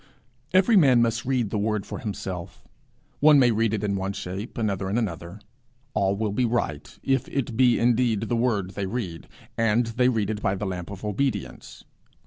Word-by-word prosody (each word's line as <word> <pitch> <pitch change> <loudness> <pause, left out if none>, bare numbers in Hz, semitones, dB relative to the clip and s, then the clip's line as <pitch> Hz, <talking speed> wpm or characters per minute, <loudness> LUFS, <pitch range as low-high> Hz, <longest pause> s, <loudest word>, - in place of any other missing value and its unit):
Every 190 +5 +4
man 130 -10 +6
must 115 0 -1
read 125 -5 0
the 105 - -1
Word 105 -1 -1
for - - -6
himself. 95 -5 -6 0.5
One 150 0 +7
may 125 -3 +5
read 110 0 +1
it 110 -2 -2
in 100 -1 0
one 95 0 -2
shape, 95 +5 -6
another 100 -4 -1
in 105 - 0
another: 90 -3 -4 0.5
all 100 0 +1
will 105 0 -1
be 115 +5 0
right 115 -11 -2
if 135 -2 +1
it 130 -4 -3
be 125 0 +4
indeed 120 -3 +2
the 120 - -1
Word 110 -6 0
they 100 0 -4
read, 95 -7 -5 0.3
and 115 +1 +3
they 120 +2 +2
read 110 -4 0
it 105 -1 -4
by 95 - +1
the 105 - -4
lamp 90 -2 -4
of 100 +1 -8
obedience. 120 +6 -3
110 Hz, 190 wpm, -25 LUFS, 100-120 Hz, 0.5 s, One